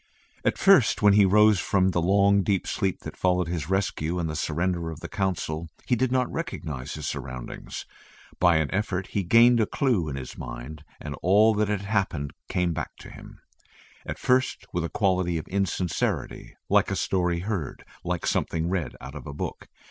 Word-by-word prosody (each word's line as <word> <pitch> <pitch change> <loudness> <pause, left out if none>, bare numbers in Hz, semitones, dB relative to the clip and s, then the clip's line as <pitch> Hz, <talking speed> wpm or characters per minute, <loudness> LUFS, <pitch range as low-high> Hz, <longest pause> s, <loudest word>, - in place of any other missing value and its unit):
At - - +1
first 190 - +5
when 105 -1 +7
he 100 -1 +6
rose 105 0 +5
from 95 +1 +2
the 85 - 0
long 100 +2 +4
deep 95 0 0
sleep 95 -4 -1
that - - -8
followed 90 -1 +1
his 85 -2 -3
rescue 90 -3 -1
and 85 -2 -1
the 80 - -4
surrender 85 +2 -1
of 80 -1 -7
the - - -7
Council, 85 -5 -2 0.2
he 125 - +2
did 125 +1 0
not 130 -1 +2
recognise 80 - -5
his 75 -2 -5
surroundings. 65 -2 -6 0.5
By 85 -1 +5
an 80 -2 0
effort 95 -2 -1
he 100 - 0
gained 115 +6 +5
a 110 - +2
clue 115 - 0
in 70 - -4
his 65 -2 -7
mind, 65 +6 -7 0.2
and 75 - -6
all 105 +5 +5
that 105 0 +1
had 105 -1 -1
happened 95 -8 -1 0.2
came 90 -2 0
back - - -5
to - - -11
him, - - -13 0.6
at - - -5
first 125 -6 +1
with 90 - -1
a 85 - -2
quality 95 -4 +1
of 80 - -6
insincerity 95 -2 -2
like - - +3
a - - -1
story 90 -2 0
heard, 95 -7 -4 0.2
like 90 -1 -2
something 85 +1 0
read 85 -8 -2
out 65 - -8
of 75 -4 -9
a 70 - -6
book. - - -5
90 Hz, 190 wpm, -26 LUFS, 80-100 Hz, 0.6 s, when